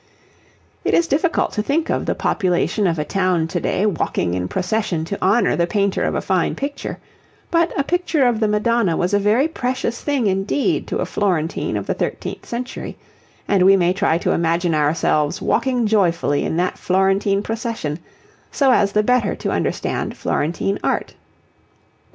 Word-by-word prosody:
It - - +2
is 340 - +3
difficult 325 +3 +1
to 210 - -1
think 305 +8 0
of - - -1
the - - 0
population 190 +1 0
of 165 -2 0
a 150 - -2
town 185 -4 +1
to 175 +1 -1
day 195 - 0
walking 160 - -1
in 90 0 -2
procession 185 - -1
to 200 +4 -5
honour 205 +6 +3
the 170 0 +1
painter 200 0 0
of - - -1
a - - 0
fine 185 -3 0
picture; 280 +1 -5 0.5
but 335 0 +2
a 280 - +2
picture 335 -3 +1
of 240 -3 +2
the 220 - +2
Madonna 210 -3 +1
was 180 +3 0
a 205 - +4
very 215 +8 +3
precious 250 -5 -3
thing 285 -5 0
indeed 195 +7 0
to - - -2
a - - 0
Florentine 175 -6 -1
of - - -4
the - - -1
thirteenth - - -4
century, 245 +2 -5 0.5
and 200 -2 +2
we 195 +1 +6
may 180 -1 +2
try 165 -3 +1
to - - -1
imagine 170 +1 +1
ourselves 150 0 +1
walking 250 -3 +1
joyfully 175 -8 +1
in 160 - -2
that 180 +1 -1
Florentine 195 +2 +1
procession 225 - -3 0.5
so 275 -4 +3
as 200 -5 +3
the 210 - +3
better 245 -2 +2
to - - -3
understand - - -2
Florentine 170 +6 -1
Art. - - -1
200 Hz, 175 wpm, -20 LUFS, 175-235 Hz, 0.5 s, we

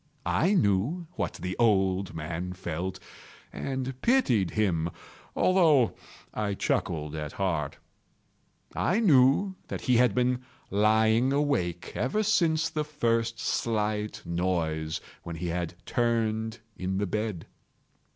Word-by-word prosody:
I 190 +6 +2
knew 115 - +1
what - - -3
the 90 0 -4
old 95 -4 +2
man 85 +3 -4
felt, 90 0 -4 0.5
and 130 -1 -4
pitied 125 - +3
him, 85 -6 0 0.5
although 160 - +4 0.4
I 105 -2 -1
chuckled 75 -5 -1
at 75 -2 -5
heart. 80 -7 -1 1.0
I 190 +6 +1
knew 155 - +4
that - - -5
he 125 -2 +3
had 125 -4 +4
been 125 0 +1 0.3
lying 110 +4 +3
awake 140 - 0
ever 210 - 0
since 165 -6 +2
the 155 -2 -2
first 115 -6 0
slight 105 -2 -1
noise, 80 -3 -1 0.2
when 85 - -6
he 85 +1 -3
had 85 0 -3
turned 110 -1 0
in 95 +1 -2
the 100 - 0
bed. 105 -3 -3
110 Hz, 120 wpm, -28 LUFS, 90-130 Hz, 1.0 s, although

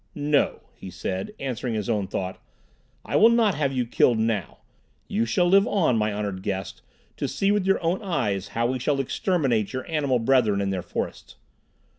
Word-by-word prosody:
"No," 145 -1 +1
he 95 - -10
said, 95 +1 -4
answering 125 -3 -3
his 105 -2 -3
own 100 -3 0
thought. 95 0 -4 0.6
"I - - -3
will 225 - +7
not 230 -4 +3
have 140 -3 0
you 125 -2 -1
killed 120 0 +3
now. 110 -5 -1 0.5
You 115 +2 0
shall 175 +10 +2
live 195 +3 +5
on, 165 - +2
my 110 -1 +1
honored 100 -2 -3
guest, 95 -1 -4 0.4
to - - -2
see 195 0 0
with 205 -2 +1
your 195 - +3
own 170 +5 0
eyes 110 - -1
how 115 - +2
we 130 +2 -1
shall 140 +3 0
exterminate 135 - 0
your 130 0 -4
animal 145 -6 +1
brethren 115 -4 +2
in 100 -1 -1
their 95 -2 -2
forests. 90 - -5
125 Hz, 185 wpm, -25 LUFS, 105-150 Hz, 0.6 s, will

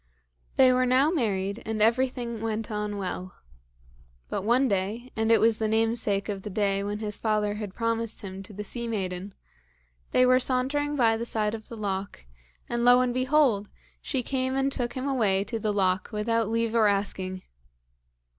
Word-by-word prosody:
They 255 -1 +6
were 255 0 +2
now 265 +5 +4
married, 200 - -1
and 220 -1 -3
everything 235 0 +1
went 225 0 -3
on 210 -1 -3
well. 185 -1 -5 0.9
But - - -2
one 240 +6 +3
day, 210 +4 -2
and 220 0 +1
it 225 - +6
was 225 -1 +3
the 220 - +1
namesake 220 -2 +1
of 200 -2 -4
the 210 - -6
day 200 0 0
when 205 +1 -3
his 210 -1 -4
father 210 -2 0
had 210 -2 -6
promised 230 -1 -2
him 190 -1 -7
to 195 - -11
the 210 +1 -6
sea 235 +3 -4
maiden, 190 -3 -4 0.7
they 255 - +4
were 255 0 +5
sauntering 275 +4 0
by 230 -4 +3
the 230 - -4
side 215 -2 0
of 220 -1 -7
the 230 - -8
loch, 195 - -4 0.4
and 235 0 -1
lo 245 +1 +7
and 250 -1 +1
behold! 255 -5 +2 0.3
she 265 -4 -2
came 260 +1 -1
and 270 0 +1
took 240 -3 -2
him 260 +1 -3
away 210 -8 +2
to 225 +2 -4
the 215 -1 0
loch 190 -2 +1
without 225 +1 0
leave 230 0 0
or 225 -2 +4
asking. 190 -2 -1
225 Hz, 185 wpm, -27 LUFS, 205-245 Hz, 0.9 s, lo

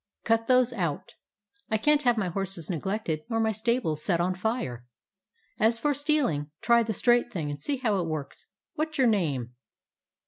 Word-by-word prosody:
Cut 225 0 +1
those 255 -1 +4
out. 170 -9 -3 0.6
I 220 - +2
can't 295 +6 +3
have 245 -3 +2
my 195 -4 0
horses 190 -2 -3
neglected 175 -1 -2
nor 225 -1 0
my 220 0 +2
stables 220 -8 -1
set 175 -4 +1
on 180 +2 +1
fire. 185 - -3 0.8
As 225 +2 +3
for 290 +5 +1
stealing, 280 - 0
try 235 -1 +4
the 225 -1 -1
straight 240 +3 +2
thing 160 -8 -3
and 145 - -7
see 285 -2 -1
how 220 -6 0
it 170 - -2
works. 155 -3 -6 0.3
What 310 0 -3
's - - -4
your 265 - +4
name?" 145 - 0
220 Hz, 180 wpm, -27 LUFS, 170-240 Hz, 0.8 s, those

